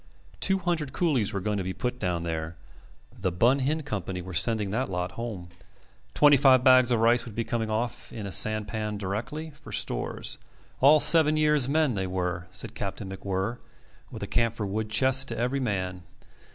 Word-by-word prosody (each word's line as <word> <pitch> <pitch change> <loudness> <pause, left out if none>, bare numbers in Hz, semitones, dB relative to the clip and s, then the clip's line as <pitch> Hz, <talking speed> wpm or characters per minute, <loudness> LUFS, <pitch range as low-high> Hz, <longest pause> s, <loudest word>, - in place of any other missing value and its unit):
Two 195 0 +4
hundred 170 -6 -2
coolies 140 - +1
were 100 - -2
going 105 +2 -2
to 95 - -2
be 95 +1 -4
put 125 +2 -4
down 90 -4 -2
there. 80 0 -4 0.6
The 95 - -1
Bun 120 +10 +3
Hin 150 +4 -1
Company 95 - -4
were 90 +1 -8
sending 100 +3 +1
that 125 +5 -1
lot 90 -1 -3
home. 105 -7 -6 0.7
Twenty 145 -1 +6
five 130 -2 +5
bags 130 -1 +6
of 120 -2 +2
rice 115 +1 +4
would 115 -4 -10
be 115 - -1
coming 115 -1 -2
off 110 +1 -3
in 110 -3 -6
a 100 - -5
sampan 105 +2 0
directly, 120 +11 -5
for - - -14
stores. - - -2 0.4
All 145 +3 +6
seven 155 -1 +5
years' 150 -4 +3
men 155 -3 +2
they 95 -2 -2
were, 90 -1 -3
said 95 0 -5
Captain 100 -1 -5
MacWhirr, 95 +4 -3 0.5
with - - -8
a - - -4
camphor 115 -2 0
wood 105 +2 -3
chest 130 +4 +3
to - - -4
every 125 +4 -1
man. 95 -7 -2
110 Hz, 185 wpm, -27 LUFS, 95-130 Hz, 0.7 s, Twenty